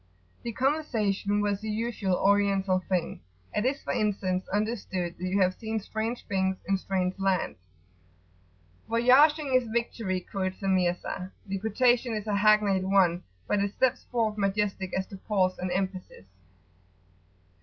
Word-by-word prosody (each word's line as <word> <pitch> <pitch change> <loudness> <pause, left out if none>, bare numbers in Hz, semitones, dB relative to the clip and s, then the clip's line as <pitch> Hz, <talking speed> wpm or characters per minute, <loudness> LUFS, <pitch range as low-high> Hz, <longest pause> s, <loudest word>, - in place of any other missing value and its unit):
The 235 - -4
conversation 215 -7 0
was 205 -1 -1
the 220 - -4
usual 215 -3 -1
Oriental 195 -1 +2
thing. 180 -3 -1 0.3
It 210 - 0
is, 275 +2 -1
for - - -2
instance, 190 -3 -1
understood 195 -4 -2
that - - -7
you 185 +2 0
have 185 -1 +3
seen 220 0 -2
strange 220 +3 -4
things 190 -2 0
in 195 -1 +1
strange 185 0 -2
lands. 190 - 0 1.3
"Voyaging 270 +5 +4
is 255 -2 +3
victory," 225 -4 -2
quotes 185 0 -4
the 195 - -3
Mirza; 180 0 0
the 195 0 -3
quotation 240 +3 +2
is 210 -1 -4
a 210 -2 0
hackneyed 205 -2 +4
one, 185 -3 +3 0.3
but 205 - +1
it 200 0 -1
steps 260 -1 +1
forth 220 -3 -1
majestic 195 -1 -1
as 190 - -1
to 195 - -10
pause 185 -2 0
and 185 - -2
emphasis. 185 - -4
200 Hz, 145 wpm, -28 LUFS, 190-220 Hz, 1.3 s, Voyaging